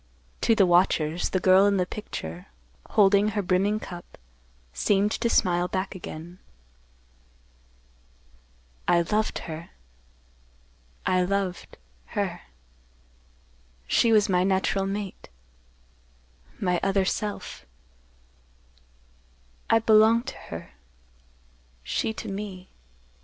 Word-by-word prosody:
To 225 - +3
the 200 - +5
watchers, 175 -2 +2
the 185 - 0
girl 190 +2 +5
in 200 -1 +2
the 180 - +1
picture, 90 - -7 0.4
holding 200 0 +4
her 205 -1 -2
brimming 195 +4 +1
cup, 175 -4 -10 0.6
seemed 205 - +1
to 235 - 0
smile 175 -4 +2
back 190 +1 -3
again. 175 -1 -9 2.5
"I 170 - +4
loved 215 +5 -1 1.7
her—I 185 0 +2
loved—her. 180 - -4 1.4
She 230 - +3
was 210 -2 +5
my 180 -1 +2
natural 195 0 +1
mate—my 60 - -7
other 195 -1 +1
self. 205 - -4 2.0
I 225 - +6
belonged 225 +1 +4
to - - -7
her—she - - -8
to 220 - -7
me. 195 -2 -6
185 Hz, 90 wpm, -26 LUFS, -, 2.5 s, I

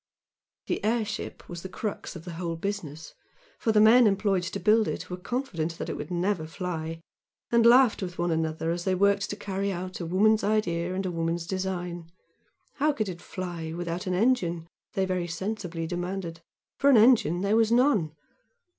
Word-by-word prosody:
This - - -1
airship 215 -1 -2
was 175 -1 -7
the 190 - -7
crux 205 0 -5
of 165 0 -9
the 175 - -6
whole 170 0 -3
business, 165 -4 -5 0.5
for 225 - +1
the 215 - +4
men 225 +2 +7
employed 195 -2 +1
to 180 +3 -4
build 215 +1 +4
it - - -4
were - - -2
confident 180 - -3
that - - -5
it - - -2
would 150 - -6
never 175 -2 -1
fly, 165 -2 -5 0.5
and 235 -1 +5
laughed 245 -2 +6
with 180 -1 -5
one 175 0 0
another 160 0 -1
as 170 0 -3
they 190 0 +1
worked 200 +1 +2
to - - -3
carry 200 0 -3
out 185 0 -5
a 170 - -4
woman's 215 +5 +3
idea 180 -4 0
and 190 +1 -2
a 185 - -1
woman's 165 0 -2
design. 175 -2 -4 0.7
How 295 +1 +2
could 215 -7 -2
it 175 -1 -7
fly 175 -4 -5
without 175 +1 -4
an 180 - 0
engine? 180 -7 +1 0.3
they 190 - +1
very 185 -2 -1
sensibly 180 -1 -4
demanded, 175 -1 -4 0.4
for 280 - +4
engine 220 - +5
there 200 +2 +2
was 225 0 +3
none! 235 - +3
185 Hz, 180 wpm, -27 LUFS, 170-210 Hz, 0.7 s, men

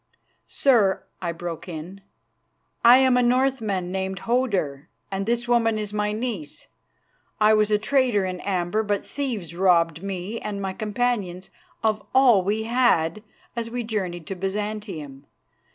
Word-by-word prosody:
"Sir," 220 -9 +3 0.2
I 170 -2 -1
broke 170 +1 -6
in, 175 +4 -8 0.8
"I 240 +2 +9
am 260 -1 +4
a - - +4
Northman 240 -7 +1
named 190 0 -3
Hodur, 200 - -1 0.2
and 195 +1 -3
this 240 +1 0
woman 230 -2 +2
is 210 -1 -4
my 210 0 0
niece. 215 - -4 0.7
I 215 0 +5
was 215 -1 +3
a 210 - +3
trader 240 -3 +2
in 185 -1 -4
amber, 185 +2 -1
but 205 -2 -2
thieves 230 - -4
robbed 170 -3 +3
me 195 +3 -4
and 205 -1 -5
my 190 -1 -3
companions 210 -4 -2 0.3
of 215 -1 +1
all 245 -8 +6
we 210 +3 0
had 220 -7 +2 0.3
as 230 -1 -3
we 245 +1 -3
journeyed 185 -7 -3
to 195 - -5
Byzantium. 195 -7 -5
210 Hz, 145 wpm, -24 LUFS, 185-235 Hz, 0.8 s, I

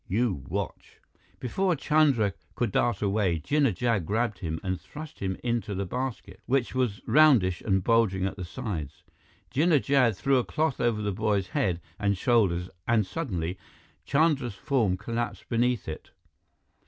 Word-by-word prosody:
You 100 - 0
watch." - - -5 0.4
Before 180 +8 0
Chandra 140 -9 +3 0.2
could 120 -4 -1
dart 120 +1 +1
away, 100 -4 +1
Jinnah 135 - +1
Jad 115 -2 +1
grabbed 110 +3 -1
him 80 -2 -3
and 95 -1 -2
thrust 155 0 -10
him 95 -1 -2
into 115 -4 -1
the 100 +1 -2
basket, 125 -4 -5
which 130 -1 +1
was 125 -6 -1
roundish 125 - +5
and 95 -3 +1
bulging 105 -5 +2
at 95 - -2
the 95 - -6
sides. 85 - -5 0.5
Jinnah 155 +2 +4
Jad 130 -7 +2
threw 135 +9 +2
a - - 0
cloth 155 -1 -1
over 115 -3 +1
the 105 - 0
boy's 100 -2 0
head 90 -4 0 0.2
and 100 -2 +1
shoulders 95 -6 +2 0.2
and 115 -3 +3
suddenly, 95 - -3 0.4
Chandra's 140 -6 +1
form 110 -3 +1
collapsed 115 +4 -4
beneath 120 -1 +1
it. 80 - -7
110 Hz, 155 wpm, -27 LUFS, 95-130 Hz, 0.5 s, roundish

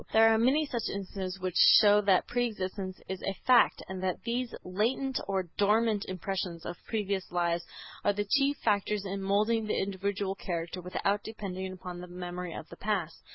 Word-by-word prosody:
There 225 0 +7
are - - +3
many 270 +7 +3
such 240 -5 -3
instances 195 -1 -5
which 185 -1 -3 0.2
show 210 -1 +6
that 195 -3 +3
pre 245 0 0
existence 190 -3 -5
is 190 -1 -5
a 195 - -2
fact, 250 -2 +5
and 190 -1 -5
that 185 -1 -2
these 240 +1 -2
latent 240 +8 0
or 195 -1 0 0.2
dormant 210 +1 +3
impressions 185 -2 -4
of 175 - -4
previous 200 -4 -2
lives 170 -1 0 0.4
are 205 - +4
the 205 +1 -2
chief 275 +6 +2
factors 205 -1 +1
in 195 0 -3
moulding 215 +3 +1
the - - 0
individual 195 0 -2
character 175 -1 -4
without 200 +3 -1
depending 190 -4 -5
upon 180 -1 -7
the 180 - -8
memory 180 0 -6
of 160 - -7
the - - -11
past. 190 -6 -2
195 Hz, 180 wpm, -30 LUFS, 185-215 Hz, 0.4 s, There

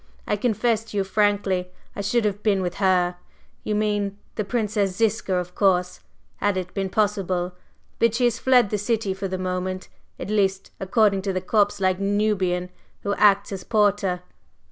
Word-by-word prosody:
I - - +1
confess 225 0 +1
to 215 - -6
you 195 - +2
frankly 195 -2 +1 0.3
I - - -3
should 215 +3 +1
have 205 0 -1
been 200 -3 +2
with 175 -1 -3
her 180 -2 +2 0.5
you 210 - -1
mean 205 -1 0 0.2
the 215 - -2
Princess 205 -3 -1
Ziska, 220 -3 +1
of 180 0 -3
course 180 -2 +1 0.4
had 205 -2 0
it 180 -1 -4
been 195 -1 -2
possible. 185 -3 0 0.5
But 230 -1 +3
she 250 - 0
has 240 -2 +2
fled 250 -5 +4
the 210 - 0
city 210 -2 0
for 195 +1 -4
the 185 0 -3
moment 185 0 -3 0.3
at - - -5
least, 195 -2 0
according 200 0 +2
to 195 0 -2
the 185 - 0
corpse 205 +1 +1
like 185 -1 +1
Nubian 195 -3 0 0.3
who 200 - 0
acts 200 0 +4
as 190 -2 -5
porter." 200 -4 +1
200 Hz, 175 wpm, -24 LUFS, 185-210 Hz, 0.5 s, fled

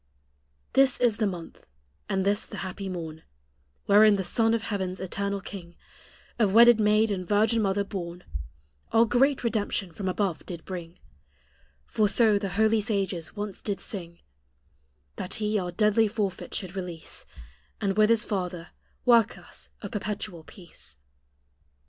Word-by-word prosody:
This 270 -1 +4
is 235 -4 +3
the 215 - +1
month, 175 -4 -7 0.5
and 190 0 0
this 205 +1 +2
the - - -8
happy 190 +1 -5
morn, 160 -3 -6 0.6
Wherein 210 +1 +7
the 195 - -1
Son 225 +4 +2
of 225 - -3
heaven's 190 -4 -3
eternal 200 +1 -2
king, 180 -4 -9 0.6
Of 210 -4 +3
wedded 235 0 +8
maid 215 +1 +3
and 185 -3 -3
virgin 220 +2 +3
mother 200 0 +1
born, 180 -3 -6 0.7
Our 225 +1 +5
great 260 +4 +2
redemption 210 -5 -1
from 190 +2 -3
above 185 -4 -1
did 170 -3 -7
bring 175 -2 -7 0.9
For 210 - +1
so 215 -1 +4
the 200 -1 -3
holy 220 0 +4
sages 195 -5 -2
once 205 -2 -5
did 200 -3 -2
sing 170 -5 -7 1.0
That 180 - -2
He 210 -1 0
our 180 -1 -3
deadly 210 +4 +3
forfeit 205 -3 -3
should 185 -1 -4
release, 180 -4 -6 0.5
And 195 -1 0
with 215 0 +5
His 230 0 +3
Father 180 -4 -3 0.4
work 235 -3 +5
us - - -11
a - - -4
perpetual 205 -6 -4
peace. 70 - -10
200 Hz, 150 wpm, -27 LUFS, 180-215 Hz, 1.0 s, wedded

